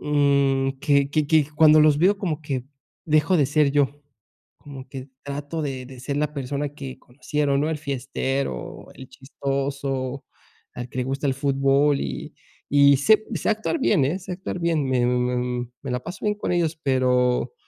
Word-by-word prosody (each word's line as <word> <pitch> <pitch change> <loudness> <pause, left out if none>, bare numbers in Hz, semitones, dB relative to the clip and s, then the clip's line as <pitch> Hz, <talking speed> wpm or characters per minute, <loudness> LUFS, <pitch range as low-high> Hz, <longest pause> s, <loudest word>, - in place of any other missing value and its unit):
um, 140 -2 +2
que 140 -1 +2
que 155 0 +1
que 155 -1 +3
cuando 155 0 +7
los 150 -1 +5
veo 190 +6 +4
como 165 -6 -2
que 135 -4 -3 0.4
dejo 155 +4 +3
de 145 -4 +3
ser 145 0 +2
yo, 145 0 0 0.6
como 135 -2 -10
que 135 0 -8 0.2
trato 145 +3 -4
de 135 -4 -4
de 130 0 -12
ser 140 +3 -3
la 150 0 -1
persona 140 +1 -3
que 135 -3 -8
conocieron, 140 +2 -1
¿no?, 150 - 0
el 160 - -2
fiestero, 135 - -3
el 130 - -11
chistoso, 135 -1 -3 0.5
al 125 0 -7
que 130 - -5
le 125 - 0
gusta 135 +2 -2
el 135 - +2
fútbol, 140 +1 +2
y 65 -2 -5 0.4
y 140 -1 +6
sé 215 +10 +4
sé - - -1
actuar 220 +9 -1
bien, 190 - +3
eh, 165 +8 -1
sé 185 0 -8
actuar 180 0 -5
bien, 165 -4 0
me 125 -2 +2
me 125 0 -1 0.2
me 135 - -4
la 125 - -1
paso 175 +8 -8
bien 210 0 +1
con - - -3
ellos, 165 -2 0
pero 125 - +1
140 Hz, 180 wpm, -23 LUFS, 130-150 Hz, 0.6 s, cuando